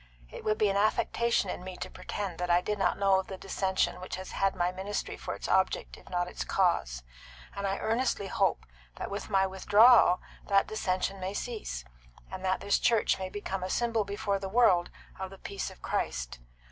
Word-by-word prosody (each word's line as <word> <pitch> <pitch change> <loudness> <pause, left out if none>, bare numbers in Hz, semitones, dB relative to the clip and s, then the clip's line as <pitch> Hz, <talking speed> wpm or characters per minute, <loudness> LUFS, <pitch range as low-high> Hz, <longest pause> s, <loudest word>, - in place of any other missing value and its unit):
It - - -8
would 215 0 +1
be 210 -2 +3
affectation 215 0 +1
in - - -6
me 185 0 -7
to - - -4
pretend 185 -1 -5
that 180 0 -2
I 175 0 +5
did 210 +3 -3
not 180 -2 +2
know 195 -1 +4
of 190 - -5
the 190 - -6
dissension 190 -1 -1
which 185 - -5
has 185 0 -7
had 195 0 +1
my 175 0 +1
ministry 190 +3 -4
for - - -5
its - - -6
object - - +1
if - - -16
not 175 -1 0
its - - -4
cause; 65 - +1 0.5
and 200 0 -2
I 195 - -1
earnestly 225 -2 0
hope - - 0 0.3
that - - -5
with 200 +2 -5
my 195 -2 +3
withdrawal 205 +1 +6 0.3
that 195 -1 +4
dissension 195 -2 -1
may 190 +2 -4
cease, 210 - -4 0.5
and 190 0 -6
that 185 0 0
this 200 - +2
church 230 -4 +2
may 190 0 -3
become 195 -1 -4
a 185 - -3
symbol 230 0 +1
before 200 0 -2
the 195 0 -5
world 190 -6 +4 0.3
of 190 0 -4
the 195 - -12
peace 200 +1 -5
of - - -16
Christ. - - -2
195 Hz, 200 wpm, -30 LUFS, 185-205 Hz, 0.5 s, withdrawal